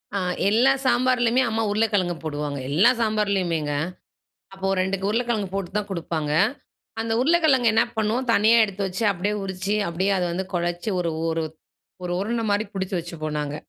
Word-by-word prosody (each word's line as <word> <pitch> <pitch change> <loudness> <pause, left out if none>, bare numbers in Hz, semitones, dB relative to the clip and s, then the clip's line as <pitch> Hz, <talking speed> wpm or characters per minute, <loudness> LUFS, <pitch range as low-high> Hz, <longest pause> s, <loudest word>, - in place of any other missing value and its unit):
ஆ - - +1 0.3
எல்லா 240 +6 +4
சாம்பார்லேயுமே 250 -1 +3
அம்மா 225 0 0
உருளைக்கிழங்கு 205 -5 +1
போடுவாங்க. 145 -2 -3
எல்லா 185 +11 +5
சாம்பார்லேயுமேங்க. 195 -8 0 0.8
அப்போ 195 0 -4
2 190 +1 -1
உருளைக்கிழங்கு 225 -3 -1
போட்டு 195 -2 -3
தான் 210 -1 -3
கொடுப்பாங்க. 160 -4 -3 0.7
அந்த 225 0 -1
உருளைக்கிழங்கு 295 -6 +4
என்ன 225 +1 +4
பண்ணுவோம் 220 +4 0
தனியா 225 +2 +5
எடுத்து 200 -1 -5
வச்சு 190 +4 -4
அப்படியே 200 +2 -2
உறிச்சி 190 +2 -2
அப்படியே 185 +4 0
அதை 180 - 0
வந்து 185 +3 -3
குழச்சி 175 +3 -2
ஒரு 170 -2 -1 0.2
ஒரு 165 0 -1 0.6
ஒரு 175 - -3
உருண்ட 230 +4 -1
மாதிரி 205 +2 +1
பிடிச்சு 190 -1 -3
வச்சுப்போம். 155 -3 -5
நாங்க 150 0 -3
195 Hz, 155 wpm, -24 LUFS, 175-225 Hz, 0.8 s, எல்லா